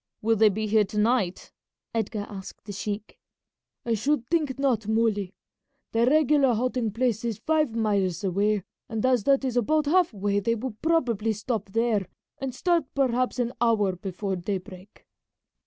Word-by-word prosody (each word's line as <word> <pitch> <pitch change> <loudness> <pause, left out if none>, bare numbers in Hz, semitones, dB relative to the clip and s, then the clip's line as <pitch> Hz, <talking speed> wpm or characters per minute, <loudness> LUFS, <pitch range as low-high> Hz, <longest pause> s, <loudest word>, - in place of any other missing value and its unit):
"Will 225 +1 +3
they 220 0 +5
be 215 +2 -2
here 215 0 +4
to 205 +1 -6
night?" 210 -4 +1 0.4
Edgar 220 -2 -2
asked 195 -2 -10
the 205 - -6
sheik. 205 +1 -5 0.7
"I 235 - +1
should 245 +3 0
think 300 -3 0
not, 250 -6 0
Muley. 215 -4 0 0.6
The 230 +1 +2
regular 290 -3 +4
halting 245 -2 -1
place 230 -2 0
is 230 -4 -2
five 305 -1 0
miles 200 -5 0
away, 200 +1 +1 0.3
and 225 +1 -2
as 250 -5 +2
that 275 -1 +3
is 255 -2 -2
about 305 +6 +2
half 350 +3 +3
way 200 -1 0
they 230 +3 0
will 240 0 -5
probably 235 -10 +1
stop 210 -1 -3
there 225 -2 +1 0.3
and 270 -2 -4
start 345 -3 +1
perhaps 255 -2 +1
an 245 0 -1
hour 210 -5 +2
before 190 +2 -4
daybreak." 185 +1 -6
225 Hz, 160 wpm, -26 LUFS, 205-255 Hz, 0.7 s, they